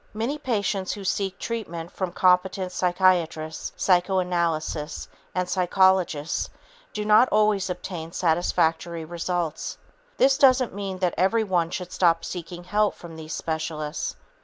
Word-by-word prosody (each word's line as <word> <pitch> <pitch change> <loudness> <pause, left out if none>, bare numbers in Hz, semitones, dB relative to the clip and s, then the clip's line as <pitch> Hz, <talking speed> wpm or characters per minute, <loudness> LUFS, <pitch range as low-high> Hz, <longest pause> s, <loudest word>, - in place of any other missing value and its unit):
Many 245 +8 -2
patients 200 -7 -1
who 205 - -7
seek 195 0 -1
treatment 175 -8 -5
from 185 -2 -3
competent 185 +1 +2
psychiatrists, 175 -4 +1
psychoanalysts 175 -4 0 0.3
and 180 0 0
psychologists 180 -4 +2 0.4
do 210 - -4
not 215 +4 +6
always 210 -3 +2
obtain 170 -2 -5
satisfactory 165 -1 0
results. 170 -1 -3 0.4
This 270 +1 +4
doesn't 255 -4 +5
mean 195 -1 -4
that 180 -2 0
everyone 190 -4 +2
should 180 0 -5
stop 165 -2 +2
seeking 175 0 -6
help 210 +3 +1
from 170 -2 -11
these 160 0 -7
specialists. 155 -2 -3
180 Hz, 120 wpm, -25 LUFS, 165-195 Hz, 0.4 s, not